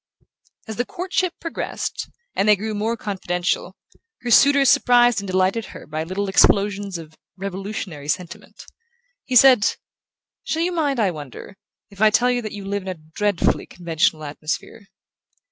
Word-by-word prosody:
As 220 - -6
the 245 - 0
courtship 365 0 -2
progressed, 330 - -4 0.3
and 200 - +2
they 210 - +7
grew 215 +2 -4
more 220 +3 -1
confidential, 180 -2 -2 0.5
her 245 -2 -3
suitor 280 +3 +6
surprised 245 -3 +5
and 200 - -7
delighted 190 +4 +1
her - - -11
by 155 +1 -4
little 190 +4 -3
explosions 200 0 +2
of 160 -1 -11 0.2
revolutionary 190 -5 -6
sentiment. 170 +3 -5 0.6
He 255 - -3
said: 250 -3 +6 0.7
"Shall 325 +1 -1
you 360 - 0
mind, 295 -7 0
I 200 -4 +2
wonder, 150 +4 -9 0.4
if 200 0 -11
I 215 - +7
tell 245 +4 +3
you 245 0 0
that 215 -2 -6
you 200 -1 -8
live 200 +1 -2
in 190 - -12
a 185 - -3
dread 170 +5 -2
fully - - +1
conventional 160 -2 0
atmosphere?" 155 +8 -5
200 Hz, 160 wpm, -22 LUFS, 180-240 Hz, 0.7 s, they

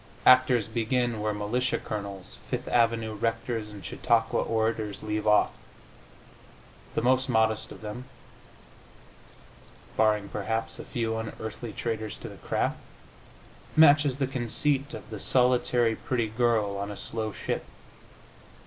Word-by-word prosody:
Actors 125 -4 +6
begin 115 0 0
where 105 0 0
militia 105 +5 0
colonels, 100 -2 -6
Fifth 125 -1 -3
avenue 115 -2 +2
rectors 115 0 -2
and 100 -4 -10
Chautauqua 115 +3 +1
orators 110 -2 -1
leave 105 0 -2
off. 105 0 +5 1.4
The - - 0
most 130 +1 +3
modest 110 -1 +1
of - - -10
them 110 +4 -6 1.9
(barring, 105 -2 +2
perhaps, 110 +3 -3
a - - -7
few 115 -2 -2
unearthly 110 0 -6
traitors 110 -1 -3
to - - -8
the - - -11
craft) - - -1 1.0
matches 145 -3 +6
the 135 - +1
conceit 135 +3 0
of - - -9
the 105 - -5
solitary 125 -1 +3
pretty 120 -3 -1
girl 110 -3 +1
on 100 +1 -3
a 105 - -6
slow 110 -1 -4
ship. - - -3
115 Hz, 125 wpm, -28 LUFS, 105-125 Hz, 1.9 s, Actors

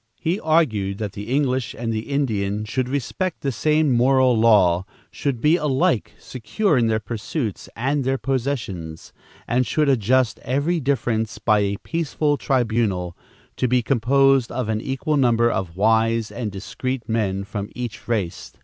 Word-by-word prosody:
He 175 +5 -1
argued 110 -12 +1
that 105 -2 -4
the 105 +2 -7
English 130 -2 0
and 115 0 -2
the 110 +3 -4
Indian 105 -7 -1
should 125 +4 -2
respect 145 +7 -2
the 135 - -1
same 150 +5 +2
moral 130 +1 +4
law, 100 -6 +4 0.3
should 140 -5 -2
be 155 +7 +4
alike 135 -7 0
secure 150 - -1
in 120 -3 +3
their 110 -1 +1
pursuits 110 - -4
and 135 +4 0
their 135 +1 0
possessions, 115 - -3 0.3
and 125 +2 +2
should 150 +3 +1
adjust 125 -1 +2
every 145 +7 0
difference 115 -6 -1
by 105 0 +2
a 100 0 0
peaceful 155 -2 0
tribunal, 110 -10 0 0.4
to 130 - +1
be 125 0 +2
composed 135 +1 +3
of 120 -2 -3
an 110 0 -1
equal 135 +4 -1
number 120 -3 +3
of 90 -2 -3
wise 115 +1 +2
and 115 -3 -4
discreet 125 +5 -5
men 100 -4 -1
from 105 0 -5
each 120 -3 -6
race. 105 -8 -3
120 Hz, 155 wpm, -22 LUFS, 110-135 Hz, 0.4 s, moral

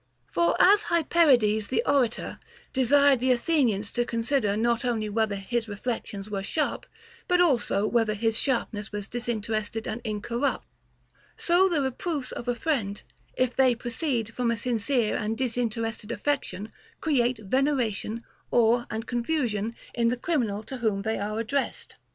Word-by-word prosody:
}. 120 -1 -44
For 170 +4 +1
as 410 +2 +6
Hyperides 260 -11 +3
the 360 - 0
orator 250 -5 0 0.3
desired 280 +1 +4
the 255 +1 +2
Athenians 240 - +1
to 240 - +1
con 230 -1 -3
sider 225 -5 +1
not 235 +2 +1
only 225 -4 -1
whether 215 -1 0
his 225 +3 -2
reflections 205 -1 -4
were 200 -2 -3
sharp, 300 +9 -2 0.4
but 360 0 +3
also 250 - +2
whether 225 -1 +1
his 225 +1 0
sharpness 225 -4 -1
was 205 -1 -4
disinterested 225 -2 -3
and 230 +3 -4
incorrupt; 235 +4 -2 0.7
so 365 +2 +4
the 315 -5 +1
reproofs 265 +1 -2
of 240 - -6
a 245 - +1
friend, 235 -9 -2 0.3
if 255 -1 +1
they 260 -2 +4
proceed 235 -1 -2
from 245 0 0
a 230 - 0
sincere 235 0 0
and 220 +1 -2
disinterested 230 -3 -2
affection, 225 -7 -2 0.3
create 255 -6 +1
veneration, 230 -1 -1 0.3
awe, 240 +1 +3
and 220 +1 -4
confusion 235 -4 -1 0.2
in 235 -1 +1
the 245 +2 +1
criminal 235 -8 -1
to 265 +4 -7
whom 215 -5 0
they 220 0 -1
are 210 +2 -2
addressed. 265 +5 -2
235 Hz, 150 wpm, -27 LUFS, 215-260 Hz, 0.7 s, as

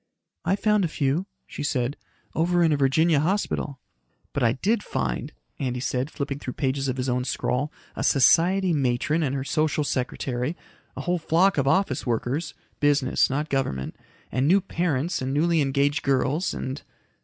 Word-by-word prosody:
"I 195 - +3
found 210 0 +2
a - - +2
few," 150 +4 -1 0.2
she - - -8
said. 130 -2 -1 0.4
"Over 175 +2 +2
in 165 - +4
a - - +4
Virginia 145 +3 +3
hospital." 160 -4 -1 0.6
"But 140 - -1
I 115 -2 +4
did 205 - 0
find," - - -3 0.3
Andy 125 -2 -2
said, 130 +2 -1
flipping 140 -3 -4
through 125 - -5
pages 135 0 -1
of 130 0 -2
his 130 0 -2
own 125 0 0
scrawl, 125 +3 -1 0.2
"a - - -3
society 175 +7 +4
matron 140 +3 +1
and 140 -3 0
her 135 - -2
social 155 +1 0
secretary, 130 +1 -2 0.4
a - - -3
whole 180 0 0
flock 170 +2 +3
of 135 - +1
office 140 -3 +2
workers 130 +7 -2 0.2
business, 145 -2 +3
not 145 +3 -1
government 130 - -2 0.4
and 130 +2 +1
new 190 +5 +5
parents 170 -4 -1
and 130 +1 -2
newly 165 +1 +3
engaged 140 +1 +1
girls 140 +5 +1
and...." 130 +2 -4
145 Hz, 165 wpm, -25 LUFS, 130-165 Hz, 0.6 s, new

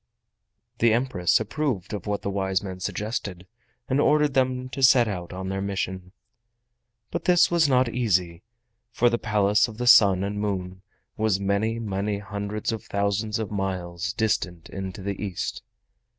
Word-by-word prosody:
The 115 -1 +4
Empress 115 -7 +2
approved 110 - -2
of 105 -1 -5
what 105 0 -2
the 100 - -2
wise 95 -1 -1
men 95 -2 -6
suggested, 100 -2 -4 0.4
and 135 +2 +2
ordered 150 -1 +3
them 130 -1 +1
to 135 - -6
set 125 -2 +6
out 90 -4 -5
on 95 +1 -5
their 95 0 -2
mission. 95 -2 -3 1.0
But - - -4
this 175 -1 +4
was 165 -4 +3
not 130 -1 +3
easy, 90 -8 0 0.5
for 120 +1 +2
the 120 - 0
Palace 105 0 +2
of 110 -2 -10
the 125 - -2
Sun 100 -6 +6
and 100 +1 -3
Moon 95 -3 -3 0.4
was 110 -3 +1
many, 100 +3 0
many 100 -2 -2
hundreds 100 +2 -4
of 110 -2 -5
thousands 100 +1 -1
of 110 -2 -4
miles 95 -3 -3
distant 100 -6 -2
into 95 0 -6
the 100 +1 -4
East. 95 -4 -4
100 Hz, 160 wpm, -25 LUFS, 95-115 Hz, 1.0 s, set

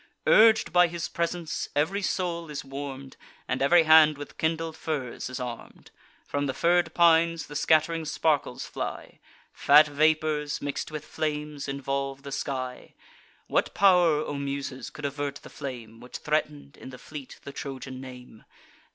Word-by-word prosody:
Urg'd 220 0 +5
by 180 0 +6
his 170 0 -4
presence, 170 -1 -3
ev'ry 160 +8 +1
soul 170 -4 -2
is 150 -2 -6
warm'd, 135 -1 -7 0.3
And 130 - -2
ev'ry 165 +5 +5
hand 155 -1 +6
with 145 0 -10
kindled 160 0 -1
fires 140 -7 -4
is 130 - -6
arm'd. 120 -2 -8 0.3
From 145 0 -2
the 130 - -3
fir'd 175 +3 +2
pines 165 -1 +4
the 145 - -11
scatt'ring 160 +2 +2
sparkles 155 -1 0
fly; - - -6 0.3
Fat 150 +2 +6
vapours, 155 0 +1
mix'd 145 0 -4
with 155 -1 -6
flames, 150 -2 -4
involve 135 0 -3
the 140 - -8
sky. 130 -2 -5 0.5
What - - 0
pow'r, 175 -6 +4
O - - -4
Muses, 140 -1 -4
could 150 - -8
avert 140 0 -3
the - - -12
flame 120 -5 -8
Which 125 +1 -8
threaten'd, 150 -1 -2
in - - -10
the 130 - -10
fleet, 145 0 -10
the 140 - -8
Trojan 130 -2 -7
name? 125 -4 -12
150 Hz, 150 wpm, -27 LUFS, 135-160 Hz, 0.5 s, by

